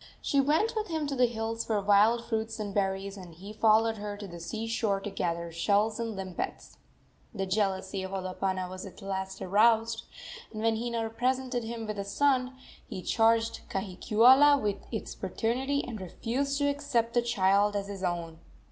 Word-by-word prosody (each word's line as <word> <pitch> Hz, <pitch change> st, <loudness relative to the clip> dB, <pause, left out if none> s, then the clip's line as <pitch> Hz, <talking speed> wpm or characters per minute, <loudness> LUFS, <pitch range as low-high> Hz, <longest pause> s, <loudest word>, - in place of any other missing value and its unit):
She 280 Hz, -, +2 dB
went 315 Hz, -, +2 dB
with 435 Hz, 0 st, -1 dB
him 320 Hz, -3 st, -2 dB
to 285 Hz, -1 st, -2 dB
the 250 Hz, -1 st, +4 dB
hills 225 Hz, 0 st, -3 dB
for 215 Hz, -2 st, 0 dB
wild 210 Hz, +4 st, +4 dB
fruits 225 Hz, -1 st, -2 dB
and 205 Hz, -2 st, -4 dB
berries, 195 Hz, 0 st, -1 dB
and 175 Hz, -4 st, -11 dB
he 195 Hz, +5 st, -9 dB
followed 220 Hz, +1 st, +3 dB
her 205 Hz, 0 st, -5 dB
to 205 Hz, -, -7 dB
the 170 Hz, -2 st, -9 dB
sea 215 Hz, +7 st, -4 dB
shore 225 Hz, -3 st, 0 dB
to 205 Hz, +1 st, -6 dB
gather 170 Hz, -3 st, -2 dB
shells 205 Hz, +6 st, +1 dB
and 230 Hz, -2 st, -3 dB
limpets. 190 Hz, -2 st, -6 dB, 0.6 s
The 195 Hz, -2 st, -1 dB
jealousy 190 Hz, -1 st, -1 dB
of 190 Hz, -, -5 dB
Olopana 185 Hz, -1 st, -2 dB
was 185 Hz, +1 st, -7 dB
at 195 Hz, +1 st, -11 dB
last 190 Hz, -1 st, -4 dB
aroused, 225 Hz, +3 st, +3 dB, 0.5 s
and 215 Hz, 0 st, -5 dB
when 225 Hz, 0 st, +3 dB
Hina 230 Hz, -1 st, -2 dB
presented 255 Hz, +1 st, -1 dB
him 225 Hz, 0 st, -5 dB
with 215 Hz, -1 st, -4 dB
a -, -, -1 dB
son 260 Hz, +4 st, +1 dB, 0.3 s
he 185 Hz, -, -6 dB
charged 225 Hz, 0 st, +2 dB
Kahikiula 235 Hz, +9 st, +5 dB
with 205 Hz, -3 st, -1 dB
its 220 Hz, -, -4 dB
paternity 255 Hz, +9 st, -1 dB
and 225 Hz, -5 st, -6 dB
refused 260 Hz, +10 st, -2 dB
to 285 Hz, 0 st, +1 dB
accept 280 Hz, -5 st, 0 dB
the 240 Hz, -, +3 dB
child 205 Hz, -2 st, +2 dB
as 200 Hz, -1 st, -2 dB
his 200 Hz, -2 st, -7 dB
own. 170 Hz, -2 st, -3 dB
215 Hz, 180 wpm, -29 LUFS, 195-235 Hz, 0.6 s, Kahikiula